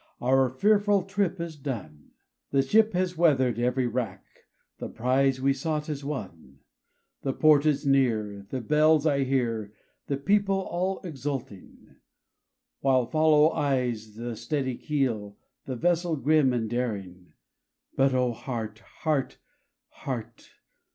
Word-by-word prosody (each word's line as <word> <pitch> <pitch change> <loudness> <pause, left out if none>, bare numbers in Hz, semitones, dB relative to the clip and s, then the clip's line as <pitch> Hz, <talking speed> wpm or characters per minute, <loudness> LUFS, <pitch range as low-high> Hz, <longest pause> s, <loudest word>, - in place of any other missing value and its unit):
our 130 +1 +3
fearful 205 - +2
trip 195 -1 -1
is 170 -1 -5
done, 110 - -7 0.4
The 135 - +2
ship 220 +9 +3
has 180 0 0
weather'd 130 -8 +3
every 125 +1 +1
rack, 120 0 -3 0.5
the - - -5
prize 130 +3 +1
we 135 +1 +2
sought 150 +2 -3
is 145 -2 -4
won, 85 - -7 0.6
The 135 - -2
port 155 0 +4
is 150 -1 +1
near, 110 -7 +1
the 130 - -3
bells 155 +4 +3
I 140 -3 +2
hear, 115 -6 -1 0.3
the 140 - -1
people 195 +6 +2
all 190 0 -2
exulting, 135 - -7 0.8
While 130 -2 +2
follow 155 +2 +4
eyes 120 -6 -1
the 120 +1 -5
steady 130 +3 -2
keel, 115 -10 -2 0.3
the 130 - -4
vessel 170 +3 +1
grim 150 -1 +3
and 120 -3 -1
daring; 100 -7 -4 0.6
But 135 -1 +3
O 125 -1 +2
heart! 110 -3 -5
heart! 150 +1 -3 0.5
heart 120 -3 -7
135 Hz, 130 wpm, -27 LUFS, 120-155 Hz, 0.8 s, port